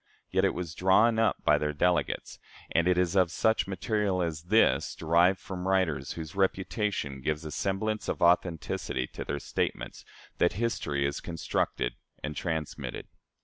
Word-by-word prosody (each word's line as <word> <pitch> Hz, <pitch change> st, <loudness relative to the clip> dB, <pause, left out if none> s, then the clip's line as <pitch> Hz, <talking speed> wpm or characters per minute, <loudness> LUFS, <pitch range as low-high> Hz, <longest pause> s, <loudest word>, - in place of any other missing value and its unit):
Yet -, -, +3 dB
it -, -, +1 dB
was 85 Hz, -3 st, -4 dB
drawn 105 Hz, +7 st, +4 dB
up 115 Hz, -, +1 dB
by -, -, +4 dB
their 75 Hz, 0 st, -1 dB
delegates, 90 Hz, +4 st, 0 dB, 0.3 s
and 85 Hz, +1 st, +2 dB
it 90 Hz, -1 st, +3 dB
is 90 Hz, 0 st, +1 dB
of 90 Hz, -3 st, +4 dB
such 110 Hz, +4 st, +1 dB
material 100 Hz, -1 st, 0 dB
as 80 Hz, -1 st, -4 dB
this, 110 Hz, +5 st, +3 dB
derived 85 Hz, +4 st, +3 dB
from 95 Hz, 0 st, -6 dB
writers 90 Hz, -8 st, +1 dB
whose 80 Hz, -2 st, -7 dB
reputation 95 Hz, -, -1 dB
gives 75 Hz, +3 st, -2 dB
a 75 Hz, -, -5 dB
semblance 110 Hz, +5 st, -2 dB
of -, -, -2 dB
authenticity 85 Hz, -7 st, +1 dB
to -, -, -5 dB
their 70 Hz, -, -3 dB
statements, -, -, -3 dB, 0.4 s
that 90 Hz, -, +3 dB
history 90 Hz, -10 st, -1 dB
is 70 Hz, -, -2 dB
constructed 80 Hz, -6 st, -2 dB, 0.3 s
and 75 Hz, 0 st, -4 dB
transmitted. 80 Hz, -2 st, -4 dB
90 Hz, 155 wpm, -29 LUFS, 80-95 Hz, 0.4 s, drawn